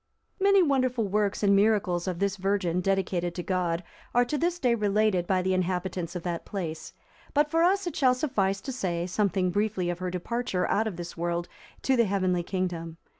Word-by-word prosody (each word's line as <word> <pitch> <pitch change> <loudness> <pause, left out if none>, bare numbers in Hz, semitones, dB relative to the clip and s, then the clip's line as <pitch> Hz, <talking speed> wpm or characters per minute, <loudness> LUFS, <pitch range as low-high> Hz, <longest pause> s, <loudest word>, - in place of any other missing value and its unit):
Many 395 -1 +5
wonderful 255 -6 +1
works 205 +1 0
and 200 -1 +5
miracles 195 -4 +2
of 180 -2 -2
this 200 +1 0
virgin, 190 -2 0
dedicated 180 -2 0
to 175 - -4
God, 180 -2 -1 0.3
are 245 0 +5
to 270 - -2
this 340 +3 0
day 250 -8 +2
related 210 -4 +1
by 185 -1 +1
the 190 0 +1
inhabitants 180 -1 -2
of 175 - -4
that 170 -2 -3
place; 160 -6 -5 0.4
but 295 +1 +3
for 330 0 +3
us 385 +3 +3
it 345 - -4
shall 255 -3 +4
suffice 200 -9 0
to 265 - -5
say 175 -8 -2
something 185 -1 0
briefly 200 -3 0
of 175 - -6
her 185 0 -2
departure 185 +2 -2
out 220 +2 +2
of 205 - -4
this 175 0 -7
world 170 +1 -2 0.4
to 265 - +3
the 235 -2 +4
heavenly 185 -3 +1
kingdom. 170 -3 -3
195 Hz, 195 wpm, -27 LUFS, 180-230 Hz, 0.4 s, Many